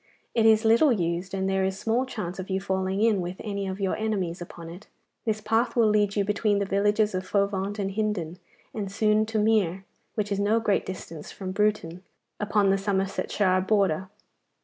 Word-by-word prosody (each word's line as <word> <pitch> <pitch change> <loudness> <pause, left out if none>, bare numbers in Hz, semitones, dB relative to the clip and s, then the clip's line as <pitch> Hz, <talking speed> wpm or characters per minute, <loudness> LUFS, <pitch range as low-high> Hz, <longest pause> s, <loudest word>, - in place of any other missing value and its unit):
'It 225 -2 +4
is 220 0 +5
little 235 +6 +5
used, 175 -3 -1
and 190 -1 -1
there 190 0 +1
is 190 0 -1
small 230 +5 0
chance 195 -7 -5
of 185 - -6
your 190 0 0
falling 190 +1 -1
in 215 -4 +3
with 175 +1 -4
any 200 -2 -3
of 190 +1 -4
your 195 -2 0
enemies 195 -6 -2
upon 170 -1 -9
it. 175 +5 -11 0.4
This 215 -1 -1
path 225 +3 +1
will 235 -2 +4
lead 210 -1 +2
you 200 -1 +1
between 205 0 +1
the 200 - 0
villages 205 +2 +2
of 185 0 -2
Fovant 200 +1 -1
and 195 -1 -2
Hindon, 195 -5 -2 0.3
and 200 -3 -4
soon 215 +1 +2
to 225 0 -2
Mere, 205 -4 +1 0.3
which 210 -1 -2
is 200 - 0
no 210 +3 +2
great 210 -3 0
distance 165 -4 -7
from 190 -2 -6
Bruton, 195 -4 0 0.4
upon 205 -1 +2
the 195 - +2
Somersetshire 195 -1 0
border. 190 -3 +1
200 Hz, 195 wpm, -26 LUFS, 190-215 Hz, 0.4 s, is